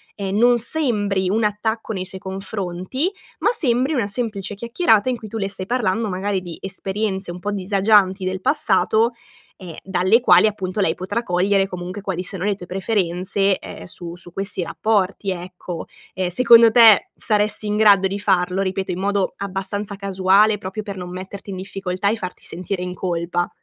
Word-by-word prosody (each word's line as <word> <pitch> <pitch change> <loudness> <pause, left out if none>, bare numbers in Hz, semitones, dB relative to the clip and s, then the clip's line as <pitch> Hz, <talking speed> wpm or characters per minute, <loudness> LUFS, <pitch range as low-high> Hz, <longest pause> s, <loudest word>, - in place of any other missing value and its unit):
ehm, 195 0 -3
non 240 +1 +4
sembri 210 -8 +1
un 215 +2 +1
attacco 220 +2 -2
nei 185 -2 -4
suoi 190 0 -8
confronti, 195 - -3 0.3
ma - - +2
sembri 260 - +1
una 245 -8 0
semplice 210 -3 -3
chiacchierata 235 - +2
in 250 - -1
cui 220 -2 -10
tu 225 - -5
le 195 -1 -2
stai 190 -1 -5
parlando 225 -2 0
magari 190 +1 -2
di 175 -3 -8
esperienze 195 0 -3
un 175 - -8
pò 205 +3 -3
disagianti 195 -1 +2
del 185 0 -3
passato, 220 - +3 0.5
ehm, 175 -4 -9
dalle 190 +4 +3
quali 220 - +6
appunto 200 -1 -3
lei 160 - +2
potrà 205 +6 -3
cogliere 195 +2 +1
comunque 180 +2 -6
quali 190 -3 -3
sono 185 0 -3
le 205 - +1
tue 180 - -10
preferenze, 190 0 0
ehm, - - -9
su 170 -1 -6
su 175 0 -12
questi 195 -1 -2
rapporti, 200 +1 0
ecco. 180 -1 -7 0.3
Ehm, 185 -1 -1
secondo 230 +3 +7
te 225 -3 +6
saresti 210 0 +1
in 210 0 0
grado 200 -3 +5
di 200 +1 -4
farlo? 185 -1 +1
Ripeto, 190 0 -2
in 180 - -4
modo 200 -1 0
abbastanza 200 +1 -4
casuale, 195 +2 +3
proprio 200 +2 -6
per 200 -2 -7
non 180 -1 -6
metterti 190 +2 -8
in 190 - -5
difficoltà 195 +1 -2
e 225 - 0
farti 185 -4 -7
sentire 180 +2 -4
in 180 0 -4
colpa? 175 -1 -2
195 Hz, 180 wpm, -21 LUFS, 185-215 Hz, 0.5 s, secondo